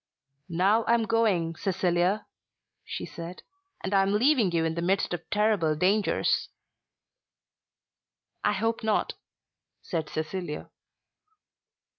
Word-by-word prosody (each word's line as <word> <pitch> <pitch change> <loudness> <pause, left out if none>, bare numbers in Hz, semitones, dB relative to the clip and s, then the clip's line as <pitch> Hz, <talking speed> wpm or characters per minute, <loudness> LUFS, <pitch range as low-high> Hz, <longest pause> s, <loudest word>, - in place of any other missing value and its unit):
"Now 190 +6 +3
I 235 - +4
am 230 - +1
going, 205 -7 +1
Cecilia," 180 +2 0 0.6
she - - -5
said, 170 +2 -8 0.4
"and 190 - -3
am 195 0 +3
leaving 235 -3 +3
you 165 -1 +1
in 160 - 0
the 170 - -3
midst 185 +1 +1
of 175 - -3
terrible 210 -7 +2
dangers." 195 +6 +1 1.9
"I - - +3
hope 225 +3 -1
not," 215 -1 +1 0.7
said 160 -4 -3
Cecilia. 155 0 -4
190 Hz, 110 wpm, -27 LUFS, 170-215 Hz, 1.9 s, I